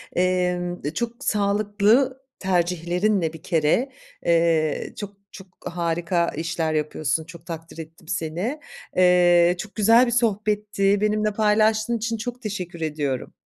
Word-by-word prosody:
Emm, 180 Hz, -1 st, 0 dB
e, 150 Hz, -, -2 dB
çok 235 Hz, 0 st, -4 dB
sağlıklı 210 Hz, +5 st, +2 dB, 0.2 s
tercihlerinle 180 Hz, 0 st, 0 dB
bir 160 Hz, -, -11 dB
kere, 165 Hz, -, +1 dB, 0.4 s
eee, 165 Hz, -3 st, +1 dB
çok, 200 Hz, -1 st, -7 dB
çok 190 Hz, -, -12 dB, 0.2 s
harika 170 Hz, 0 st, -1 dB
işler 160 Hz, 0 st, -2 dB
yapıyorsun. 155 Hz, 0 st, -1 dB
Çok 170 Hz, -1 st, -13 dB
takdir 165 Hz, -1 st, -8 dB
ettim 160 Hz, 0 st, -11 dB
seni. 190 Hz, -, -3 dB, 0.4 s
Eee, 180 Hz, -1 st, +5 dB
çok 215 Hz, -, -7 dB
güzel 230 Hz, +4 st, +5 dB
bir 240 Hz, -, -2 dB
sohbetti. 210 Hz, -3 st, +1 dB
Benimle 215 Hz, 0 st, +1 dB
paylaştığın 215 Hz, +2 st, +2 dB
için 230 Hz, +1 st, -2 dB
çok 245 Hz, +3 st, -6 dB
teşekkür 180 Hz, -6 st, -5 dB
ediyorum. 145 Hz, -4 st, -3 dB
180 Hz, 125 wpm, -23 LUFS, 165-215 Hz, 0.4 s, Eee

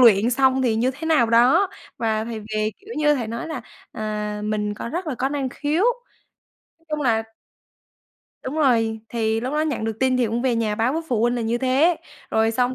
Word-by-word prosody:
luyện 230 Hz, -1 st, +6 dB
xong 265 Hz, +1 st, +3 dB
thì 225 Hz, -3 st, +2 dB
như 250 Hz, +3 st, +2 dB
thế 320 Hz, +3 st, -6 dB
nào 305 Hz, -8 st, +4 dB
đó, 260 Hz, +12 st, +5 dB, 0.3 s
và 220 Hz, -1 st, 0 dB
thầy 225 Hz, -2 st, -5 dB
về, 215 Hz, 0 st, -2 dB
kiểu 420 Hz, +3 st, -9 dB
như, 295 Hz, -1 st, +3 dB
thầy 240 Hz, -5 st, -2 dB
nói 230 Hz, +4 st, -4 dB
là, 290 Hz, -6 st, -4 dB, 0.3 s
à, 210 Hz, -1 st, -3 dB
mình 210 Hz, -1 st, -1 dB
có 235 Hz, -, -6 dB
rất 345 Hz, +4 st, -4 dB
là 290 Hz, -, -2 dB
có 265 Hz, +3 st, -1 dB
năng 280 Hz, -2 st, -2 dB
khiếu, 295 Hz, +7 st, -1 dB, 1.0 s
nói 330 Hz, -, -33 dB
chung 300 Hz, -1 st, -2 dB
là 225 Hz, -4 st, +2 dB, 1.2 s
Đúng 260 Hz, +3 st, -4 dB
rồi. 225 Hz, -6 st, +2 dB
Thì 225 Hz, -1 st, 0 dB
lúc 255 Hz, +3 st, -3 dB
đó 300 Hz, -, +1 dB
nhận 295 Hz, -8 st, -1 dB
được 220 Hz, -1 st, -3 dB
tin 260 Hz, -1 st, +3 dB
thì 245 Hz, -2 st, +2 dB
cũng 230 Hz, +3 st, -2 dB
về 255 Hz, -3 st, +2 dB
nhà 215 Hz, -2 st, 0 dB
báo 230 Hz, +5 st, +1 dB
với 325 Hz, -, -1 dB
phụ 230 Hz, -3 st, +1 dB
huynh 240 Hz, +1 st, +2 dB
là 240 Hz, -, -1 dB
như 230 Hz, +2 st, 0 dB
thế, 270 Hz, +7 st, +3 dB, 0.3 s
rồi 220 Hz, 0 st, +3 dB
xong 250 Hz, +2 st, +1 dB
240 Hz, 220 wpm, -23 LUFS, 220-275 Hz, 1.2 s, luyện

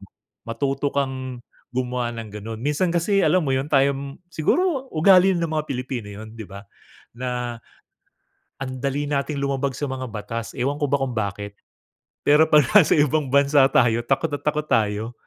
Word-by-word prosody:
mo. 100 Hz, -, -15 dB, 0.4 s
Matuto 135 Hz, +4 st, -2 dB
kang 130 Hz, -2 st, -3 dB, 0.3 s
gumawa 125 Hz, -1 st, -2 dB
ng 115 Hz, -3 st, -8 dB
ganon. 110 Hz, +2 st, -6 dB
Minsan 150 Hz, +8 st, 0 dB
kasi 185 Hz, +4 st, +1 dB
alam 180 Hz, -5 st, +2 dB
mo 135 Hz, -, +1 dB
'yun 135 Hz, +3 st, -2 dB
tayong 140 Hz, 0 st, +1 dB
siguro 270 Hz, -, 0 dB
ugali 185 Hz, +3 st, +5 dB
ng 170 Hz, -, 0 dB
mga 155 Hz, -1 st, -2 dB
Pilipino 125 Hz, -4 st, -4 dB
'yun, 110 Hz, +2 st, -10 dB
'di 115 Hz, -, -7 dB
ba? 100 Hz, +1 st, -10 dB, 0.5 s
Na 125 Hz, -1 st, -4 dB, 1.0 s
ang 135 Hz, -1 st, -5 dB
dali 140 Hz, +1 st, -1 dB
nating 145 Hz, 0 st, -2 dB
lumabag 140 Hz, -1 st, -1 dB
sa 145 Hz, -, -2 dB
mga 130 Hz, -2 st, -5 dB
batas, 110 Hz, +2 st, -5 dB
ewan 140 Hz, +4 st, -1 dB
ko 145 Hz, -, +1 dB
ba 140 Hz, -, +2 dB
kung 135 Hz, -2 st, -3 dB
bakit. 100 Hz, -1 st, -4 dB, 0.7 s
Pero 150 Hz, +2 st, +5 dB
'pag 150 Hz, -2 st, +6 dB
nasa 195 Hz, -8 st, +6 dB
ibang 150 Hz, 0 st, +2 dB
bansa 140 Hz, 0 st, +4 dB
tayo 120 Hz, -3 st, +3 dB
takot 145 Hz, +3 st, 0 dB
na 145 Hz, -, -3 dB
takot 150 Hz, 0 st, -1 dB
tayo. 110 Hz, -3 st, 0 dB
135 Hz, 170 wpm, -23 LUFS, 120-150 Hz, 1.0 s, pag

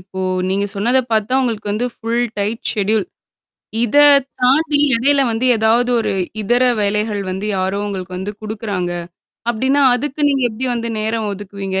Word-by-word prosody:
இப்போ 190 Hz, 0 st, -8 dB, 0.3 s
நீங்க 200 Hz, +2 st, 0 dB
சொன்னத 235 Hz, +6 st, +2 dB
பாத்தா, 220 Hz, +2 st, 0 dB
உங்களுக்கு 220 Hz, -4 st, -2 dB
வந்து 235 Hz, +4 st, -1 dB
ஃபுல் 235 Hz, +2 st, -1 dB
டைட் 210 Hz, +3 st, -2 dB
செட்யூல் 210 Hz, 0 st, 0 dB, 0.8 s
இத 240 Hz, +5 st, +2 dB, 0.4 s
தாண்டி 290 Hz, +4 st, +3 dB, 0.2 s
எடையில 275 Hz, +5 st, +3 dB
வந்து, 230 Hz, +3 st, 0 dB
ஏதாவது 225 Hz, +3 st, +2 dB
ஒரு -, -, -1 dB, 0.3 s
இதர 240 Hz, +5 st, +2 dB, 0.2 s
வேலைகள் 210 Hz, +1 st, 0 dB
வந்து, 190 Hz, +3 st, -4 dB
யாரோ 190 Hz, +1 st, -1 dB
உங்களுக்கு 185 Hz, -2 st, -5 dB
வந்து 190 Hz, +3 st, -4 dB
குடுக்குறாங்க, 210 Hz, -4 st, -3 dB, 0.6 s
அப்டின்னா 265 Hz, +5 st, +1 dB
அதுக்கு 290 Hz, +4 st, -3 dB
நீங்க 275 Hz, -2 st, +1 dB
எப்டி 230 Hz, +4 st, -4 dB
வந்து 235 Hz, 0 st, -3 dB
நேரம் 220 Hz, 0 st, -1 dB
ஒதுக்குவீங்க? 195 Hz, -1 st, -5 dB
220 Hz, 145 wpm, -18 LUFS, 200-245 Hz, 0.8 s, தாண்டி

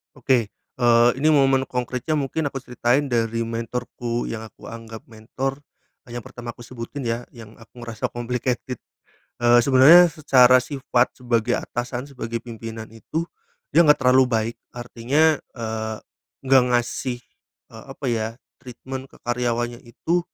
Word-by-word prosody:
Oke, 125 Hz, -5 st, +1 dB, 0.3 s
eee, 120 Hz, 0 st, +5 dB
ini 150 Hz, -, +2 dB
momen 135 Hz, -3 st, +4 dB
konkretnya, 125 Hz, +4 st, -2 dB
mungkin 145 Hz, +2 st, -1 dB
aku 135 Hz, -2 st, -6 dB
ceritain 125 Hz, +3 st, 0 dB
dari 115 Hz, -1 st, 0 dB
mentorku 120 Hz, +1 st, -4 dB
yang 110 Hz, 0 st, -6 dB
aku -, -, -23 dB
anggap 115 Hz, -1 st, -9 dB
mentor, 130 Hz, +5 st, -4 dB, 0.5 s
yang 120 Hz, -1 st, -7 dB
pertama 120 Hz, -1 st, -8 dB
aku 120 Hz, -, -12 dB
sebutin 125 Hz, +3 st, -7 dB
ya, 115 Hz, +1 st, -3 dB
yang 115 Hz, -2 st, -11 dB
aku 120 Hz, +2 st, -13 dB
ngerasa 115 Hz, -2 st, -3 dB
complicated. 125 Hz, 0 st, -3 dB, 0.6 s
Eee, 120 Hz, 0 st, +5 dB
sebenarnya 145 Hz, +7 st, +7 dB
secara 130 Hz, -5 st, +5 dB
sifat 130 Hz, -2 st, 0 dB
sebagai 120 Hz, 0 st, +1 dB
atasan, 120 Hz, +1 st, -4 dB
sebagai 115 Hz, -3 st, -5 dB
pimpinan 115 Hz, -1 st, -8 dB
itu, 155 Hz, +9 st, -4 dB, 0.5 s
dia -, -, +4 dB
enggak 150 Hz, -2 st, +5 dB
terlalu 130 Hz, 0 st, +5 dB
baik, 115 Hz, -1 st, -1 dB, 0.2 s
artinya, 130 Hz, +6 st, +1 dB, 0.2 s
eee, 110 Hz, -2 st, -4 dB, 0.5 s
enggak 130 Hz, -1 st, +5 dB
ngasih, 120 Hz, +1 st, -2 dB, 0.5 s
eee, -, -, -11 dB
apa -, -, -7 dB
ya, 110 Hz, -2 st, 0 dB, 0.3 s
treatment 130 Hz, +2 st, -8 dB
ke -, -, -22 dB
karyawannya 120 Hz, 0 st, -1 dB
itu, 165 Hz, +9 st, -1 dB
120 Hz, 140 wpm, -23 LUFS, 115-130 Hz, 0.6 s, sebenarnya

